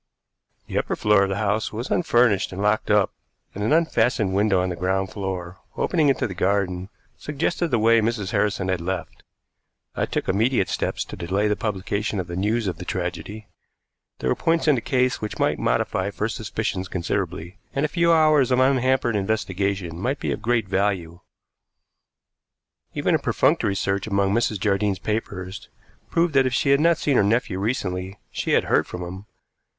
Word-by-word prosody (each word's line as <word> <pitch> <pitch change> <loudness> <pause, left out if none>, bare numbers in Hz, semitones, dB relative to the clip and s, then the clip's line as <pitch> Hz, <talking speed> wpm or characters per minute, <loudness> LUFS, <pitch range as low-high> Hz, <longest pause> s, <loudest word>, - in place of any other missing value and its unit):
The - - -1
upper - - -2
floor 105 -1 +3
of 100 - +1
the 95 - -1
house 105 +1 0
was 115 +4 -5
unfurnished 120 - +2
and 95 - -7
locked 105 +1 +1
up, 105 -1 +3 0.4
and 100 - -4
an 110 - 0
unfastened 120 - +2
window 100 -1 +3
on 90 0 0
the 90 - -3
ground 95 +2 -1
floor, 95 -3 -5 0.2
opening 160 -5 +2
into 135 - +1
the 95 - -4
garden, 95 -1 0 0.3
suggested 165 +4 -1
the 125 - +1
way 115 +1 +4
Mrs. 110 -3 -1
Harrison 100 -2 0
had 95 -2 0
left. 90 +1 -4 0.7
I - - -1
took - - -3
immediate 110 +1 +2
steps - - -2
to - - -8
delay 95 +4 0
the 105 - +1
publication 105 0 -2
of 90 - -2
the 85 0 -6
news 105 +5 0
of 90 -4 -2
the - - -5
tragedy. 90 +4 -4 0.7
There 65 - -2
were - - +2
points 165 0 +1
in 150 - +6
the 125 - 0
case 125 0 +1
which 105 - -4
might - - +1
modify 95 +2 0
first 105 +3 -3
suspicions 105 -3 -3
considerably, 90 0 -3 0.2
and 140 +2 +1
a - - +1
few 170 +2 +2
hours 155 -5 +4
of 125 0 +3
unhampered 130 -2 +2
investigation 95 -4 -1
might 130 +8 -1
be - - -2
of - - -3
great 115 -2 +1
value. 95 -3 -1 1.8
Even - - +1
a - - +3
perfunctory 100 - +1
search 95 +1 -1
among 100 -1 +1
Mrs. 110 -2 +1
Jardine's 100 -1 +1
papers 95 -2 -4 0.4
proved 170 -1 +1
that 135 -1 +4
if 125 - -1
she 140 - +2
had 140 - +5
not 165 +1 +4
seen 140 -4 +1
her - - +5
nephew 100 -2 +1
recently 95 -3 -2
she - - -2
had - - +4
heard - - +2
from 90 - -6
him. 95 +3 -8
105 Hz, 185 wpm, -23 LUFS, 95-120 Hz, 1.8 s, in